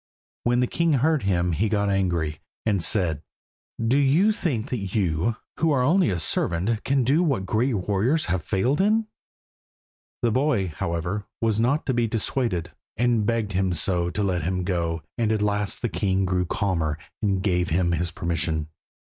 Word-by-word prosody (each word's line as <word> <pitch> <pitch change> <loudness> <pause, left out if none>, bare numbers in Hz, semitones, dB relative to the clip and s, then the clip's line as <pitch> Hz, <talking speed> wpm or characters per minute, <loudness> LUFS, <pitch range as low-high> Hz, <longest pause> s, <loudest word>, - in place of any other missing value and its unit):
When 120 +1 +3
the - - +3
king 165 +5 +1
heard 150 +2 +2
him, 90 -2 +1
he 100 +7 0
got 100 -1 +1
angry, 85 -6 0 0.3
and 100 -4 +1
said 80 -3 +1 0.6
"Do 115 +5 +2
you 155 +10 +4
think 140 - -2
that 100 -6 -3
you, 95 +2 +1 0.2
who 165 - +2
are 130 -3 +2
only 175 - +3
a 90 -3 -1
servant, 90 +7 0
can 135 -1 +2
do 140 +8 +3
what 135 - 0
great 115 +6 +1
warriors 105 - +1
have 95 -1 -1
failed 120 - +1
in?" 215 +3 +3 1.2
The 120 - +3
boy, 125 -7 +1
however, 85 +4 -3
was 110 -2 +1
not 125 +7 +1
to 130 - 0
be 120 -1 +1
dissuaded, 110 -6 -1 0.3
and 120 -2 +2
begged 115 -3 0
him 95 0 +1
so 85 +1 0
to 90 +4 -2
let 90 -3 0
him 90 +3 -1
go 85 -3 -1 0.2
that 110 -2 +2
at 110 - +1
last 105 +1 -1
the - - +2
king 95 -3 0
grew 90 0 0
calmer 85 -7 -1 0.2
and 100 -3 0
gave 90 -3 +1
him 85 +1 +1
his 85 +1 0
permission. 80 -2 -2
100 Hz, 175 wpm, -24 LUFS, 90-120 Hz, 1.2 s, you